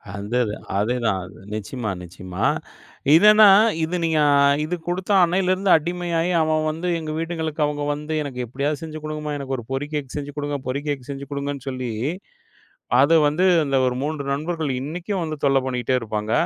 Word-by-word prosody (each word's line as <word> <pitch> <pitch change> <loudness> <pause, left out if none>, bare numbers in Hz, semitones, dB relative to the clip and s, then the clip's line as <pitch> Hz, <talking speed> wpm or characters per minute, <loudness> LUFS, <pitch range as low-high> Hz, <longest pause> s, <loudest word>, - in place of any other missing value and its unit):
அந்தது 105 +2 -1 0.2
அதேதான். 105 -4 -1 0.2
நிச்சியமா, 110 +1 -4
நிச்சியமா. 90 +1 -7 0.7
இதன்னா 210 +4 +8 0.4
இது 170 +3 -1
நீங்க 160 -2 +2 0.5
இது 180 +3 -2
குடுத்த 185 +3 -2
அன்னையிலேருந்து 185 +2 +2
அடிமையாயி, 175 +1 -1
அவன் 155 0 +1
வந்து 165 +3 -4
எங்க 155 -1 -5
வீட்டுங்களுக்கு 160 -2 -3
அவங்க 145 0 -2
வந்து, 150 +2 -5
எனக்கு 130 -3 -6
எப்டியாவது 140 +4 -2
செஞ்சு 155 -1 -6
குடுங்கம்மா. 150 -1 -4
எனக்கு 135 -1 -3
ஒரு 120 - -7
பொறி 135 +2 -2
கேக் 145 -3 -4
செஞ்சு 145 0 -5
குடுங்க, 145 0 -2
பொறி 135 +3 -2
கேக் 140 -3 -2
செஞ்சு 140 0 -5
குடுங்கன்னு 140 -1 -4
சொல்லி, 130 -2 -4 1.1
அத 150 +4 +4
வந்து 165 +6 +1 0.2
இந்த 135 -1 +1
ஒரு 125 - -1
3 150 -1 -3
நண்பர்கள் 155 0 -2
இன்னைக்கும் 175 +6 -3
வந்து 155 -1 -4
தொல்ல 135 -1 +4
பண்ணிட்டே 125 0 0
இருப்பாங்க. 110 0 -3
145 Hz, 155 wpm, -22 LUFS, 130-165 Hz, 1.1 s, இதன்னா